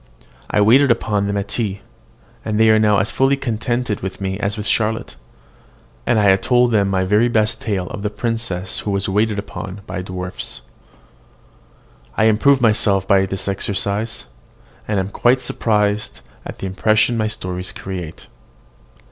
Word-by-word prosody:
I 105 - +2
waited 130 +7 +5
upon 105 -4 +1
them 100 0 -1
at 100 0 -3
tea, 105 -4 -2 0.6
and 105 0 -1
they 110 0 +6
are 110 - +5
now 105 -1 +4
as 95 +2 0
fully 135 +1 +2
contented 120 -3 -2
with 95 0 -6
me 95 0 -3
as 100 +1 -2
with 105 - -5
Charlotte; 110 +1 0 0.9
and - - +3
I 100 -2 +5
told 125 +3 +2
them 100 -3 +2
my 95 -1 +1
very 105 +5 +3
best 110 -1 +1
tale 100 -5 -2
of 100 - -6
the 105 - -1
princess 105 -4 -3
who - - -4
was 100 -1 -1
waited 105 +2 +1
upon 100 -1 -6
by 90 - -5
dwarfs. 90 -8 -5 1.5
I - - +3
improve 120 +5 +4
myself 105 -4 +3
by 95 -1 +4
this 95 +1 -4
exercise, 100 +2 -2 0.6
and 105 -2 0
am 95 +1 -2
quite 120 +5 +2
surprised 105 -4 -1 0.3
at - - -8
the - - -6
impression 110 +4 +2
my 110 -1 0
stories 90 -3 -4
create. 90 -4 -7
105 Hz, 160 wpm, -19 LUFS, 95-110 Hz, 1.5 s, they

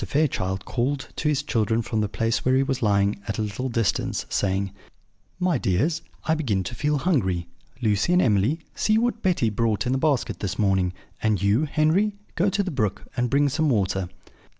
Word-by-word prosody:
Fairchild 95 - -1
called 130 +3 -2
to 150 - 0
his 150 -1 +1
children 115 -3 0
from 110 0 -1
the 105 - -1
place 115 +2 -1
where 130 0 +3
he 135 - +4
was 135 -2 -2
lying, 100 -2 +2
at 100 - -2
a 110 - 0
little 105 +5 -3
distance, 115 -3 0
saying: 95 0 0 0.7
"My 180 -7 +1
dears, 145 - +1 0.2
I 160 - +2
begin 115 -12 0
to 95 - -6
feel 150 +5 0
hungry. 95 - +1 0.4
Lucy 105 - +2
and 180 - +5
Emily, 115 - +2
see 215 0 +2
what 235 0 0
Betty 170 -12 +1
brought 110 0 0
in 125 - 0
the 130 - +1
basket 145 -4 0
this 100 0 -3
morning; 95 -3 +2 0.3
and 110 -3 +2
you, 100 +9 +2
Henry, 160 +8 +2 0.2
go 185 +4 +2
to 200 +1 0
the 185 - -3
brook, 110 - -1
and 125 -1 0
bring 145 +2 +3
some 155 +3 +1
water." 95 -5 0
120 Hz, 195 wpm, -24 LUFS, 100-150 Hz, 0.7 s, and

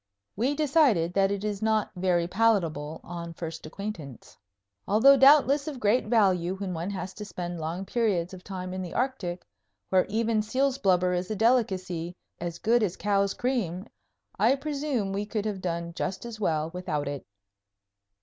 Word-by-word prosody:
We 255 +8 0
decided 275 - +3
that 195 0 +3
it 200 0 -3
is 210 -1 -3
not 220 -1 +1
very 175 -2 +1
palatable 170 -7 +1
on 170 -1 -7
first 160 -2 -6
acquaintance. 165 - -7 0.5
Although 235 +7 +6
doubtless 280 +1 +5
of 285 -5 -5
great 215 +4 +2
value 190 -6 +2
when 190 -1 -4
one 170 +3 -3
has 190 -1 -5
to 210 - -8
spend 175 -3 -5
long 165 +4 -4
periods 195 -5 0
of 185 -1 -10
time 185 -2 -6
in 185 - -4
the 180 -2 -6
Arctic, 205 -9 -2 0.4
where 185 -1 +3
even 225 0 +1
seal's 260 +5 0
blubber 180 -2 +3
is 180 +1 -2
a 215 - -2
delicacy 185 -7 +1 0.2
"as 170 -1 -4
good 235 +2 +2
as 195 -4 -1
cow's 200 -1 +1
cream," 210 -8 -1 0.5
I 270 - +4
presume 275 -8 -2
we 205 +1 -2
could 215 -1 -2
have 205 -3 -3
done 170 -1 -3
just 190 +5 -4
as 230 -2 -7
well 160 -5 0
without 155 -5 -3
it. 140 -1 -4
195 Hz, 170 wpm, -27 LUFS, 175-225 Hz, 0.5 s, Although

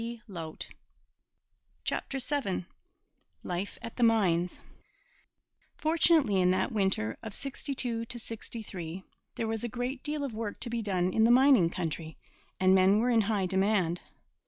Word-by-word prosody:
CHAPTER 275 - -2
VII 255 -9 -2 0.8
LIFE 180 +3 -3
AT 230 - -7
THE - - -3
MINES 180 -7 +2 1.2
Fortunately, 315 - +3
in 180 - +4
that 185 - +1
winter 190 - 0
of 220 -3 -7
'62 255 -4 -3
'63, 210 -7 -6 0.3
there 225 - -2
was 225 0 -2
a 240 - -2
great 250 +3 -3
deal 295 -1 -2
of 270 -5 -3
work 215 -1 -4
to 235 - -2
be 235 -1 -1
done 185 -3 0
in 220 - +3
the 230 - +5
mining 250 -7 +6
country, 160 -2 -4 0.4
and 185 0 +5
men 190 +2 +5
were 240 +3 +2
in 230 -2 +5
high 205 -2 0
demand. 190 -2 +1
220 Hz, 135 wpm, -30 LUFS, 185-245 Hz, 1.2 s, mining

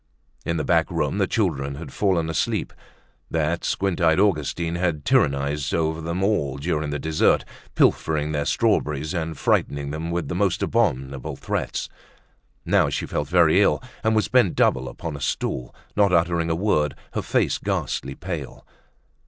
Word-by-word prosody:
In 85 - 0
the 75 - -1
back - - +2
room - - -1
the - - +2
children 70 0 -1
had 80 +4 -9
fallen 90 -5 +1
asleep. 80 - -1 0.6
That 80 +1 0
squint 95 -2 -1
eyed 80 +1 +4
Augustine 85 -3 +1
had 85 -4 -1
tyrannized 70 0 +1
over 80 0 0
them 85 +3 -2
all 75 -10 0
during 75 0 -1
the 75 - -2
dessert, 80 +2 +2 0.3
pilfering 75 -1 +2
their 75 -1 -1
strawberries 75 +2 +1
and 80 -3 -3
frightening 70 +1 0
them 80 +2 -4
with 85 -3 -2
the 75 - -3
most 95 0 +1
abominable 70 - 0
threats. - - -3 0.8
Now - - +3
she - - -2
felt 75 - -2
very 85 +3 +4
ill, - - +3 0.2
and 110 0 +2
was 110 -4 +2
bent - - +3
double - - +2
upon 80 -3 -6
a 70 - -8
stool, 60 -2 -2 0.2
not 100 -2 +4
uttering 85 -1 +2
a 80 - +1
word, 80 -6 +1 0.2
her - - -1
face - - 0
ghastly 65 0 -2
pale. 85 -6 -6
80 Hz, 160 wpm, -23 LUFS, 75-85 Hz, 0.8 s, eyed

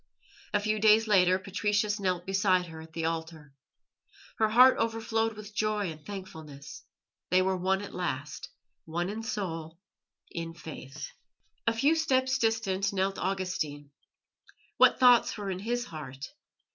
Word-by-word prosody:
A - - +4
few 215 +1 0
days 215 +1 +5
later 185 -3 +4
Patricius 205 +2 0
knelt 180 -3 -1
beside 190 -2 +2
her 160 -1 -9
at 160 0 -13
the 165 -1 -2
altar. 160 -3 -4 0.8
Her 220 -1 +3
heart 250 +4 +7
overflowed 225 0 0
with 210 0 -10
joy 210 -4 0
and 155 -1 -12
thankfulness. 160 -8 -9 0.5
They 185 +1 +4
were 190 0 +1
one 190 +2 0
at 205 - -9
last 155 -5 -4 0.4
one 175 +3 -2
in 215 +2 -4
soul, 165 -7 -4 0.5
in 165 -1 -5
faith. 145 -3 -8 0.6
A 230 - +4
few 275 +7 +3
steps 260 -5 +1
distant 205 -3 0
knelt 195 0 -1
Augustine. 180 -7 -3 0.9
What - - +5
thoughts 245 -3 +5
were 200 -2 -3
in 185 - -4
his 240 +4 -2
heart? 140 - -8
190 Hz, 145 wpm, -29 LUFS, 165-215 Hz, 0.9 s, heart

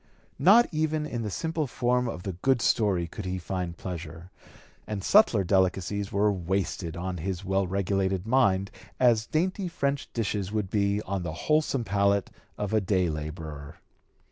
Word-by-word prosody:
Not 225 +6 +7
even 155 -1 0
in 120 -6 -4
the 105 - -3
simple 160 - -2
form 125 +1 0
of 90 -6 -5
the 95 - -3
"good 125 +9 +1
story" 100 -6 +2
could 95 +4 -8
he 95 0 -2
find 90 -1 -4
pleasure, 85 0 -7 0.6
and 105 -3 -4
subtler 120 - +5
delicacies 95 +1 +1
were 105 +1 +2
wasted 90 -2 -2
on 90 +1 -3
his 90 +2 -4
well 95 0 +1
regulated 95 0 0
mind 100 -6 +2 0.3
as 120 -3 +4
dainty 185 +4 0
French 140 -4 -2
dishes 105 -4 -2
would 105 -3 -2
be 100 0 +1
on 95 -1 -3
the 85 -3 -4
wholesome 150 -5 +2
palate 100 -2 +1 0.3
of 105 0 -3
a 110 - +3
day 95 -2 +1
laborer. 75 -1 -6
100 Hz, 160 wpm, -27 LUFS, 90-120 Hz, 0.6 s, Not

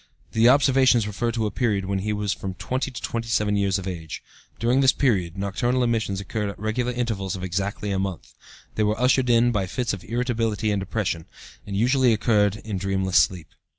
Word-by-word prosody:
The 115 +2 +5
observations 130 -4 +4
refer 105 +3 -2
to 110 -1 -1
a 105 - -1
period 105 -5 0
when 95 0 -1
he 105 +3 -2
was 105 -1 -1
from 95 -1 -6
20 130 +7 -2
to 125 - -8
27 115 -3 0
years 100 -1 +1
of 95 -1 -6
age. 80 -4 -6 0.3
During 120 +4 +2
this 135 -1 +6
period, 95 - 0
nocturnal 120 +6 0
emissions 110 -5 0
occurred 105 +1 -3
at 100 - -8
regular 110 +4 -1
intervals 110 -6 -2
of 95 - -7
exactly 100 +3 -2
a 95 - 0
month. 95 -2 -5 0.4
They 110 - 0
were 105 +1 0
ushered 125 0 +3
in 120 +1 +4
by 100 -5 -1
fits 120 +4 -2
of 95 - -6
irritability 115 -3 -1
and 100 - 0
depression, 95 -4 -3 0.4
and 100 -1 -3
usually 125 +2 +3
occurred 105 -2 +2
in 105 -4 -3
dreamless 95 -1 0
sleep. 85 -4 +2
105 Hz, 195 wpm, -24 LUFS, 95-120 Hz, 0.4 s, this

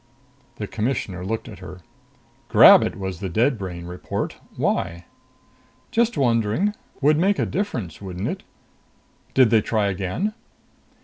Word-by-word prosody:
The - - -4
Commissioner 105 -5 -3
looked 110 +5 -3
at 105 - -10
her. 90 -1 -10 0.7
"Grab - - +9
it, - - -2
was 95 -3 -5
the 95 -1 -4
dead 115 +7 +1
brain 90 -3 -6
report. 90 +1 -4 0.2
Why?" 85 +1 -1 0.9
"Just 235 +1 +1
wondering. 120 - +1 0.3
Would 150 +2 +4
make 195 +3 +3
a - - +1
difference, 125 - -3
wouldn't 95 -1 -4
it? - - -4 0.9
Did 130 -4 +5
they 110 -2 +5
try 105 -2 0
again?" 100 - -2
105 Hz, 135 wpm, -23 LUFS, 95-135 Hz, 0.9 s, Grab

